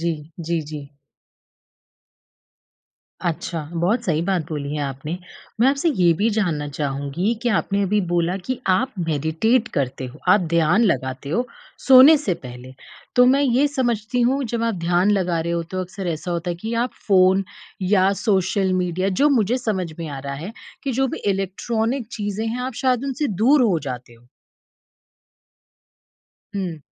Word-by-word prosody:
जी, 170 0 0 0.4
जी, 170 - +1 0.2
जी। 150 - -4 2.4
अच्छा, 170 -1 -2
बहुत 195 +9 0
सही 160 -3 +1
बात 175 -3 -1
बोली 145 -2 -4
है 150 - -2
आपने। 140 +5 -5 0.4
मैं 250 - +5
आपसे 280 +4 +2
ये 180 - +3
भी 210 +8 +1
जानना 155 -8 0
चाहूँगी 145 +7 -2
कि 240 - 0
आपने 200 -2 0
अभी 205 +2 +1
बोला 175 +1 +1
कि 235 +7 -4
आप 245 +8 +2
मेडिटेट 160 - +1
करते 130 -1 -2
हो, 125 - -11
आप 185 +3 +6
ध्यान 170 +7 +4
लगाते 130 - -1
हो 240 +10 0 0.4
सोने 270 +4 +9
से 240 -11 -1
पहले, 125 +1 -10 0.4
तो 250 - +7
मैं 270 +3 +4
ये 270 +1 +3
समझती 245 -3 -1
हूँ 265 +3 +2
जब 230 -1 -2
आप 230 -1 +1
ध्यान 175 +3 +2
लगा 180 -4 +1
रहे 170 +1 -2
हो 170 0 -1
तो 185 0 -2
अक्सर 185 +1 -6
ऐसा 170 +2 -3
होता 170 0 -2
है 175 - -2
कि 220 +7 -5
आप 250 - -4 0.2
फ़ोन, 190 0 +5 0.4
या 190 0 +3
सोशल 190 -2 +1
मीडिया 185 +1 0
जो 295 - +5
मुझे 240 -2 +2
समझ 195 -8 -2
में 165 - -4
आ 140 - -6
रहा 140 0 -5
है, 170 +10 -6 0.3
कि 275 - -1
जो 265 +2 +1
भी - - -4
इलेक्ट्रॉनिक 220 +5 -2
चीज़ें 205 0 -3
हैं 235 +3 -3
आप 255 0 -4
शायद 255 -1 +2
उनसे 275 +2 -1
दूर 245 +8 +3
हो 195 -9 +2
जाते 125 -4 -7
हो? 115 +1 -21 2.3
हुँ। 180 -6 -3
190 Hz, 165 wpm, -22 LUFS, 165-235 Hz, 2.4 s, सोने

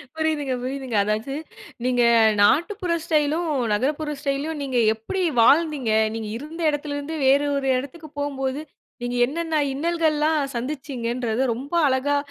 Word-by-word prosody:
புரியுதுங்க, 310 -4 -1
புரியுதுங்க. 260 -2 -4
அதாவது 215 +6 -2 0.5
நீங்க 250 -1 +2 0.4
நாட்டுப்புற 345 - +2
ஸ்டைலும், 315 +1 +1 0.2
நகரப்புற 295 +7 -1
ஸ்டைல்யும், 290 +2 -2
நீங்க 260 -3 -2 0.2
எப்பிடி 295 - -4 0.2
வாழ்ந்தீங்க! 285 -2 +3 0.2
நீங்க 220 -2 -4
இருந்த 315 +5 -8
இடத்தில 290 0 -3
இருந்து, 290 +3 -5
வேறு 280 +2 +4
ஒரு 270 -1 -2
இடத்துக்கு 295 +4 -7
போம்போது, 275 0 -2 0.4
நீங்க 245 0 -2
என்னென்ன 320 0 -1
இன்னல்கள்ல்லாம் 315 0 +1 0.2
சந்திச்சீங்கன்றத, 245 -3 -3
ரொம்ப 270 +7 -8
அழகா 275 +2 +1
285 Hz, 120 wpm, -23 LUFS, 260-310 Hz, 0.5 s, வேறு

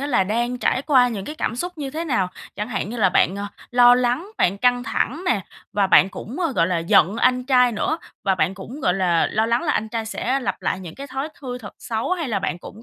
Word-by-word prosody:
á 280 - -2
là 215 -9 +2
đang 240 +4 -1
trải 255 - +1
qua 255 -4 +4
những 200 -5 -5
cái 300 - -6
cảm 235 - -2
xúc 355 +3 -5
như 275 -2 -4
thế 320 +3 -4
nào? 235 - 0 0.3
Chẳng 210 +3 -3
hạn 215 -2 -3
như 240 - -5
là 195 -4 +3
bạn, 185 +2 +2
ờ, 200 0 -4 0.2
lo 245 0 +7
lắng, 250 - 0
bạn 195 +3 +2
căng 245 +1 +2
thẳng 245 +6 -2
nè, 225 - +2 0.3
và 200 -2 +2
bạn 190 - +6
cũng, 250 - -8
ơ, 330 -6 0
gọi 165 - +2
là, 180 -1 0
giận 170 +4 +3
anh 250 +1 +2
trai 250 -2 +4
nữa, 270 +9 -1 0.3
và 190 -1 +3
bạn 180 +2 0
cũng, 230 +10 -9
gọi 180 - +2
là, 180 -3 +2
lo 220 +1 +1
lắng 235 +1 +1
là 295 - +1
anh 220 - -1
trai 225 0 -3
sẽ 255 +4 -1
lặp 195 -6 -3
lại 190 - -1
những 175 -3 -9
cái 280 +1 -8
thói 270 +2 -4
thư 250 -2 -5
thật 210 - -10
xấu 225 +4 -3
hay 335 -6 -2
là 215 -4 0
bạn 185 -2 -3
cũng 215 +5 -12
240 Hz, 265 wpm, -22 LUFS, 195-260 Hz, 0.3 s, lo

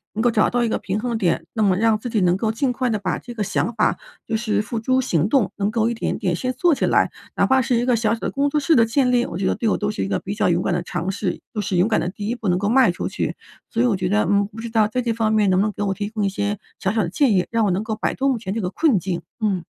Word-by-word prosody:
能 220 - -1
够 240 - +4
找 215 -1 +3
到 245 0 +1
一 230 - 0
个 - - -1
平 195 +3 -3
衡 240 0 -2
点， 185 -6 0
那 220 - -1
么 190 -3 +3
让 225 0 +3
自 245 - -5
己 220 - 0
能 180 -1 +3
够 220 +2 0
尽 250 +2 0
快 255 0 -1
地 215 - 0
把 195 -3 -2
这 245 - -10
个 210 - -1
想 210 +3 -1
法 - - +1 0.3
就 225 - -1
是 220 -2 0
付 225 +1 -4
诸 260 +3 +1
行 185 - +1
动， 250 -9 +2
能 200 +1 0
够 225 0 +1
一 235 - 0
点 230 - -2
点 180 -5 -1
先 255 +6 -2
做 345 +5 +2
起 - - 0
来。 - - +2 0.2
哪 - - +3
怕 265 0 +3
是 245 0 0
一 235 +1 +1
个 250 -2 +3
小 225 0 +1
小 - - -12
的 - - -3
工 280 +1 +1
作 300 +1 +1
室 310 +3 +3
的 235 - +6
建 250 +2 +1
立， 245 -1 +3
我 170 - -5
觉 190 - -2
得 - - +2
对 225 - -1
我 - - +1
都 205 0 -1
是 - - -3
一 - - -2
个 - - 0
比 200 - -5
较 205 -3 +1
勇 175 +1 +1
敢 175 - 0
的 175 - 0
尝 175 +1 -3
试， 195 - -3
就 215 - -2
是 185 -2 -1
勇 180 +5 +4
敢 225 - +2
的 175 - -2
第 205 +2 -6
1 235 - 0
步 225 -3 -5
能 180 - +2
够 200 +2 -1
迈 260 0 +5
出 - - -4
去。 - - -3 0.3
所 230 +1 0
以 - - +3
我 225 -5 +2
觉 185 -1 -2
得， 210 +1 +2
嗯， 200 0 +2
不 220 +2 -12
知 230 0 -6
道 220 -2 +3
在 250 +3 -2
这 230 -1 0
方 220 -1 0
面 210 -3 +3
能 185 - +3
不 - - +2
能 215 - -1
给 205 - -4
我 195 -1 0
提 205 +1 -4
供 215 -2 -2
一 - - +1
些 205 +1 -2 0.2
小 190 - 0
小 220 -2 +1
的 170 - -3
建 255 - +2
议， 180 -2 +2
让 230 -1 +2
我 200 - +1
能 185 +4 -1
够 220 -1 -3
摆 215 - -2
脱 270 - 0
目 260 -4 +1
前 190 -3 -5
这 225 - -1
个 180 -1 -2
困 285 -3 +2
境， 175 -1 -3 0.2
嗯。 195 -6 0
215 Hz, 365 characters per minute, -22 LUFS, 195-235 Hz, 0.3 s, 的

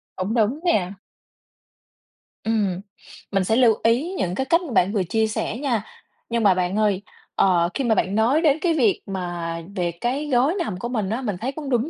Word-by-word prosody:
Cũng 190 +4 -2
đúng 235 +5 +1
nè. 195 - +1 1.5
Ừm, 205 -5 0 0.5
mình 195 -1 +1
sẽ 220 +4 +1
lưu 240 -3 +5
ý 255 +11 +2
những 180 0 -1
cái 265 - -1
cách 335 +5 +3
bạn 190 +1 +3
vừa 195 -3 +1
chia 220 +5 0
sẻ 215 +1 -3
nha, 245 -7 -1 0.5
nhưng 230 -1 0
mà 195 -2 +6
bạn 180 +1 -1
ơi, 205 -3 +2 0.3
ờ, 175 -3 +3
khi 275 - -2
mà 225 -3 +2
bạn 190 +2 0
nói 245 +9 +3
đến 300 -2 +3
cái 340 -2 +2
việc 240 -10 +2
mà 175 -3 -4 0.2
về 175 -3 0
cái 275 +5 -1
gối 260 +7 +3
nằm 210 - -2
của 240 - -4
mình 215 -6 -2
á, 230 +4 -2
mình 205 -7 -3
thấy 260 +3 -1
cũng 285 -1 -7
đúng 245 +3 +1
220 Hz, 200 wpm, -23 LUFS, 190-260 Hz, 1.5 s, mà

